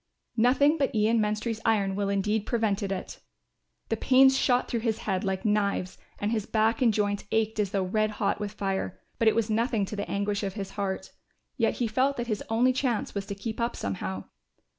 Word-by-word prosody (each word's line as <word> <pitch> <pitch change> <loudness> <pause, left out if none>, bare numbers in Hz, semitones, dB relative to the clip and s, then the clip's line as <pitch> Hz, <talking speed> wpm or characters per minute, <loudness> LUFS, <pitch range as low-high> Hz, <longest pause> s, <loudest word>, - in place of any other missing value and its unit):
Nothing 280 +7 +4
but 275 -4 0
Ian 220 +2 +3
Menstrie's 215 +1 -1
iron 200 -4 +2
will 200 0 -1
indeed 210 +2 0
prevented 210 -4 0
it. 190 -1 -5 0.7
The 225 - +1
pains 265 +3 +5
shot 250 -1 +2
through 235 - -1
his 225 -1 0
head 190 -3 0
like 190 +2 -2
knives 200 -3 0 0.2
and 205 +1 -1
his 220 -2 -1
back 225 +2 +1
and 240 -3 +5
joints 205 -1 -1
ached 220 0 0
as 205 -2 +1
though 195 -1 0
red 215 +3 +1
hot - - 0
with 205 -1 -4
fire, 195 -2 -3 0.2
but 230 - +3
it 220 - +5
was 225 -1 +1
nothing 225 -1 +1
to 210 - -6
the 205 - -4
anguish 200 0 -1
of 195 -1 -3
his 195 -3 -5
heart; 190 -2 -3 0.4
yet 230 - +1
he 240 - 0
felt 260 +5 +1
that 240 - -2
his 215 -3 -2
only 245 +3 +3
chance 250 -4 -1
was 200 -1 -4
to 200 - -4
keep 220 +3 -5
up 235 - 0
somehow. 95 -1 -4
215 Hz, 205 wpm, -27 LUFS, 200-230 Hz, 0.7 s, pains